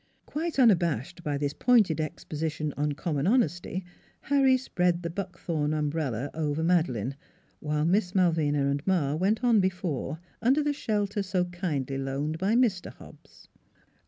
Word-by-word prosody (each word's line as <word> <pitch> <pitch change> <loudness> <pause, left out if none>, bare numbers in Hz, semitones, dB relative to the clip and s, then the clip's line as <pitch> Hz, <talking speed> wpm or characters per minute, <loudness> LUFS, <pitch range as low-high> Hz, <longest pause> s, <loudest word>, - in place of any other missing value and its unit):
'" - - -43
Quite 325 +1 -3
unabashed 175 - +2
by 145 -3 -1
this 145 0 -2
pointed 210 -8 +3
exposition 155 0 -4
on 145 +1 0
common 150 0 -2
honesty, 190 -5 0 0.4
Harry 270 -2 +4
spread 180 -8 0
the 170 - -3
Buckthorn 170 -5 -2
umbrella 145 -4 -2
over 155 0 -1
Madeleine, 145 - +1 0.4
while 150 0 -1
Miss 180 +1 +1
Malvina 160 -6 +2
and 140 +1 0
Ma 165 -7 +2
went 200 +9 0
on 235 -3 +5
before 180 -6 -2 0.2
under 265 +6 +3
the 295 0 +1
shelter 210 -5 -1
so 185 -2 0
kindly 150 -7 -3
loaned 140 +4 -3
by 200 +5 +1
Mr. 225 -7 +1
Hobbs. - - -17
170 Hz, 145 wpm, -28 LUFS, 150-200 Hz, 0.4 s, on